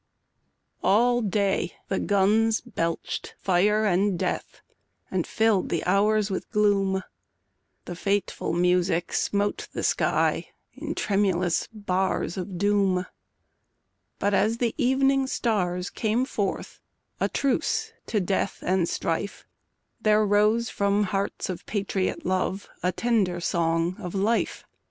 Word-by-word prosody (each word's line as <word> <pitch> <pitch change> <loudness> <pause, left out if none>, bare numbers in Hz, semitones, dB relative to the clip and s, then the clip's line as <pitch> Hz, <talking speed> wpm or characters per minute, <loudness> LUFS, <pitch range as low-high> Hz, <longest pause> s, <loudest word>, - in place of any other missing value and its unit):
ALL 240 +4 +4
day 200 -4 0
the 195 - -1
guns 215 +3 +3
belched 170 -9 -4
fire 205 +4 +2
and 195 0 +2
death - - -3 0.5
And - - -1
filled 220 -4 +2
the 170 - -1
hours 205 +2 +2
with 190 - -4
gloom; 195 -3 +2 0.8
The 175 - -6
fateful 200 0 -1
music 180 0 +1
smote 205 0 0
the - - -3
sky - - +1 0.2
In - - -5
tremulous 185 -4 +1
bars 190 -5 -1
of 185 -1 -5
doom; 195 -2 +2 1.1
But 205 +1 0
as 220 +3 +2
the 235 -2 0
evening 270 0 +2
stars 180 -8 -1
came 230 +3 0
forth 200 -7 -3 0.4
A - - +1
truce 445 - 0
to 215 - +1
death 195 +1 -1
and 185 -2 +1
strife, 165 +5 -3 0.6
There 215 0 +4
rose 210 +3 +3
from 200 +1 +1
hearts 200 0 -2
of 185 - -5
patriot 195 -2 -2
love 185 +1 -1
A 180 - +1
tender 195 -4 0
song 170 +1 0
of 180 -2 -6
life. 215 +4 0
200 Hz, 120 wpm, -26 LUFS, 185-215 Hz, 1.1 s, ALL